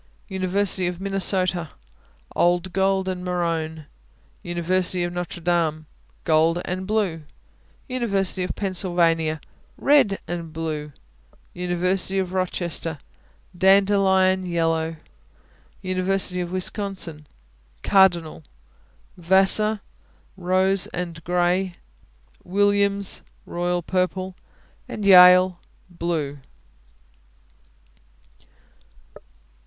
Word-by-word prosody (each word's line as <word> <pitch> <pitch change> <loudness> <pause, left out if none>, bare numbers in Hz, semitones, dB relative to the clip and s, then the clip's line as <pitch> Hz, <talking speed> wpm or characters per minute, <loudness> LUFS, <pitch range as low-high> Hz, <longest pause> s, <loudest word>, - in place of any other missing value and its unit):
University 190 0 +1
of 175 -1 -4
Minnesota 185 -3 0 0.7
Old 175 +1 +1
gold 190 0 +1
and 185 -1 -4
maroon. 165 -3 -3 0.6
University 175 +1 -1
of 175 0 -3
Notre 175 0 -5
Dame 165 -2 0 0.4
Gold 165 +1 +2
and 185 +1 -4
blue. 200 -7 -1 0.7
University 200 -8 -1
of 180 - -3
Pennsylvania 170 -5 0 0.4
Red 265 -9 +3
and 170 -1 -5
blue. 155 -2 -5 0.6
University 180 +2 -1
of 185 -1 -2
Rochester 175 -3 -2 0.6
Dandelion 190 0 +3
yellow. 165 -1 -1 0.9
University 185 0 0
of 175 -1 -5
Wisconsin 185 -5 -2 0.6
Cardinal. 175 -5 +3 0.8
Vassar 195 +4 +3 0.5
Rose 185 +1 +1
and 170 -2 -6
gray. 180 +2 0 0.7
Williams 200 +1 +1 0.2
Royal 175 0 -2
purple. 185 +1 -2 0.5
Yale 185 -2 +6 0.3
Blue. 165 -5 -3
180 Hz, 75 wpm, -23 LUFS, 170-190 Hz, 0.9 s, Yale